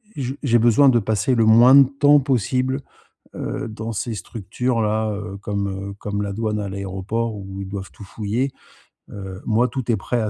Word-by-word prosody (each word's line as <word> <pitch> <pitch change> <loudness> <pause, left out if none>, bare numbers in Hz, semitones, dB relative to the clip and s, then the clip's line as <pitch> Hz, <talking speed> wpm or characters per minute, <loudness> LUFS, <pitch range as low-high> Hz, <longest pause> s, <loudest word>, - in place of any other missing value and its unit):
je 130 -2 -3
j'ai 120 -5 +3
besoin 120 +5 +5
de 125 - +4
passer 110 +4 0
le 115 -2 +3
moins 120 +4 +7
de 140 -2 +8
temps 145 +1 +4
possible, 130 +1 0 0.6
heu, - - -4
dans 110 +1 -5
ces 115 +2 -3
structures-là, 110 +1 -2
heu, 100 -1 -6
comme, 100 -1 -3
heu, - - -11
comme 105 0 -3
la 100 -1 -3
douane, 110 0 -2
à 100 - -4
l'aéroport 100 +4 -3
où 95 -1 -7
ils 95 - -7
doivent 95 0 -6
tout 105 - -12
fouiller. 110 +6 -2 0.6
Heu, 95 -1 -8
moi, 115 +3 +3
tout 125 -1 -3
est - - +3
prêt 120 -2 -2
à 110 - -1
110 Hz, 190 wpm, -21 LUFS, 100-125 Hz, 0.6 s, de